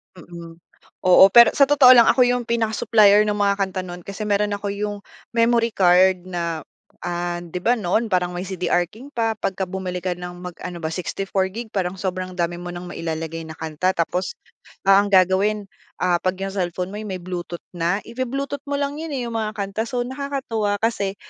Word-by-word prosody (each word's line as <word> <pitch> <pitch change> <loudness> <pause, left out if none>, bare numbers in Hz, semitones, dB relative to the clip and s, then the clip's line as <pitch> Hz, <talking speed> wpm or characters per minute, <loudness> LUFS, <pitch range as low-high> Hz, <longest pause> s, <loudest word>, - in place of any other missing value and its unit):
Mm, 170 -1 -11 0.5
oo. 185 +1 +8
Pero 235 0 +9
sa 280 - +4
totoo 275 -3 +7
lang 240 -2 +7
ako 255 - +5
yung 245 -1 0
pinaka 230 -2 0
supplier 210 -2 +5
nung 210 0 0
mga 200 0 +2
kanta 190 -1 -1
nun 175 -1 -8
kasi 200 +3 -6
meron 205 0 0
ako 200 0 -4
yung 205 +1 -3 0.4
memory 230 -1 +2
card 185 0 +4
na, 170 -3 -4 0.4
ah, 175 0 -3
di 175 +1 -6
ba 235 +7 +2
noon 220 +2 0
parang 180 -3 0
may 180 +1 -5
CDR 180 -1 0
King 250 +10 -14
pa, 225 -4 -1
pagka 190 -2 -3
bumili 180 -1 -4
ka 180 0 -2
ng 175 0 -8
mag 180 -1 -8
ano 175 -1 -6
ba, 160 - -3
64GB 195 +5 -3
parang 185 -1 -2
sobrang 185 -1 -3
dami 175 -1 -1
mo 175 0 -6
ng 175 0 -8
mailalagay 165 0 -4
na 160 0 -10
kanta 160 +3 -1
tapos, 175 +2 -1 0.6
ah, 195 +1 +7
ang 205 - -4
gagawin, 195 +2 +3 0.3
ah, 180 -1 +2
'pag 185 0 -1
yung 195 0 -4
cellphone 180 0 -2
mo 205 - -6
ay - - -6
may 190 -2 -4
Bluetooth 175 -1 -6
na, 175 +3 0
ibu-Bluetooth 270 +4 -4
mo 285 - 0
lang 285 0 -2
yun, 320 0 -5
eh, 255 -4 -3
yung 230 - -6
mga 215 -1 -2
kanta. 200 +2 -2
So, 250 - -2
nakakatuwa 260 -7 -2
kasi 205 -3 -1
195 Hz, 195 wpm, -22 LUFS, 180-225 Hz, 0.6 s, Pero